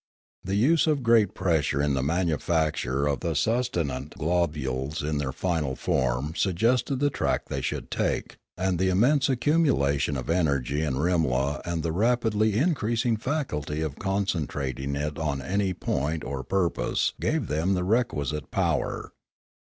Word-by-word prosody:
The 95 +1 -2
use 150 +11 +3
of 150 -4 +1
great 115 -4 +4
pressure 80 -5 +1
in 70 0 +2
the 65 - 0
manufacture 80 -3 0
of 70 -1 0
the 85 -3 -2
sustenant 80 - -1
globules 75 -4 -1
in 75 0 -1
their 70 -2 -2
final 75 -3 -1
form 65 +5 0
suggested 115 - +1
the 145 +2 +1
track - - -1
they - - -2
should - - -4
take; - - -1 0.2
and 90 -1 0
the 95 0 +2
immense 130 +9 +3
accumulation 120 - +2
of 65 -1 -5
energy 70 -5 +1
in 75 -5 -1
Rimla 75 -3 +1
and 85 -2 -2
the 85 - -1
rapidly 110 +1 +2
increasing 120 -6 +1
faculty 105 - -2
of 75 -3 -4
concentrating 75 -9 -2
it 75 +2 -3
on 75 -3 -1
any 95 +7 0
point 75 -2 -2
or 70 -1 -4
purpose 90 +2 0
gave - - 0
them 85 +6 0
the 90 - -1
requisite 75 - 0
power. - - -1
85 Hz, 145 wpm, -26 LUFS, 70-105 Hz, 0.2 s, great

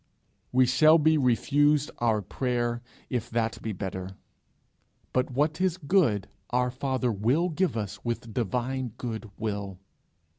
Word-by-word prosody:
We 130 0 +5
shall 155 +6 +6
be 160 0 +4
refused 145 +4 +3
our 110 -3 +1
prayer 120 +2 -1 0.3
if 120 -2 -2
that 115 -1 -1
be 110 - -3
better; 95 -1 -5 1.0
but 130 0 +1
what 150 +6 0
is 185 -2 +1
good 140 - +2 0.2
our 125 0 +1
Father 130 -1 -1
will 125 - +1
give 175 -4 0
us 100 -2 -5
with 120 -1 -4
divine 125 +3 -2
good 115 -2 -5
will. 100 -3 -3
125 Hz, 135 wpm, -27 LUFS, 110-140 Hz, 1.0 s, shall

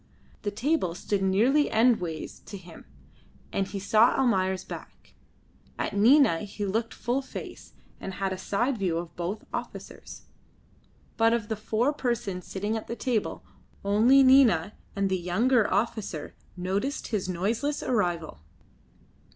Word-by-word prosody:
The 205 - -2
table 220 - 0
stood 200 +2 -2
nearly 230 +10 +3
endways 220 -9 +1
to 200 - -7
him, 175 -3 -13 0.7
and 195 - 0
he 200 - -6
saw 215 +4 +4
Almayer's 190 -7 +1
back; - - -11 0.6
at - - -3
Nina 230 - +5
he 205 0 -5
looked 225 +4 -1
full 245 +3 -1
face, 270 - -9 0.3
and 190 - -6
had 195 -1 -1
a - - -5
side 235 +6 -1
view 180 -4 0
of 170 0 -6
both 175 +5 -4
officers; - - -7 0.9
but 225 0 +4
of 230 -3 -1
the 220 - 0
four 220 +6 0
persons 235 -9 -3
sitting 205 +3 -2
at 220 - -5
the 235 - -4
table 240 -4 -2 0.4
only 230 +7 +5
Nina 255 -9 +5 0.2
and 200 0 +1
the 190 -1 0
younger 215 +7 +2
officer 205 -6 -2 0.2
noticed 195 +10 -2
his 200 -4 -2
noiseless 225 +11 -1
arrival. 175 - -1
210 Hz, 140 wpm, -27 LUFS, 190-240 Hz, 0.9 s, Nina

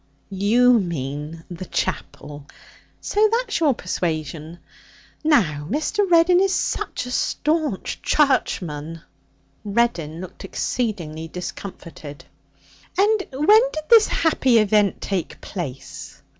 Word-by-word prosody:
'You 230 +5 +4
mean 155 -2 -5
the 175 +1 -7
chapel. 145 -1 -4 0.5
So 425 +1 +2
that's 465 -3 0
your 295 -6 +3
persuasion. 160 -3 -4 0.7
Now 165 - +2
Mr. 315 - 0
Reddin 345 +1 +5
is 385 0 +2
such - - -2
a - - -7
sta'nch 300 - -1
Charchman.' 165 - 0 0.6
Reddin 200 -8 0
looked 185 -1 -9
exceedingly 170 -10 -3
discomfited. 165 -4 -8 0.7
'And 410 +1 +2
when 305 +12 +5
did 310 - -5
this 450 -2 +8
happy 265 -7 +2
event 210 -2 +2
take 190 -4 -3
place?' 140 -9 -8
200 Hz, 100 wpm, -22 LUFS, -, 0.7 s, this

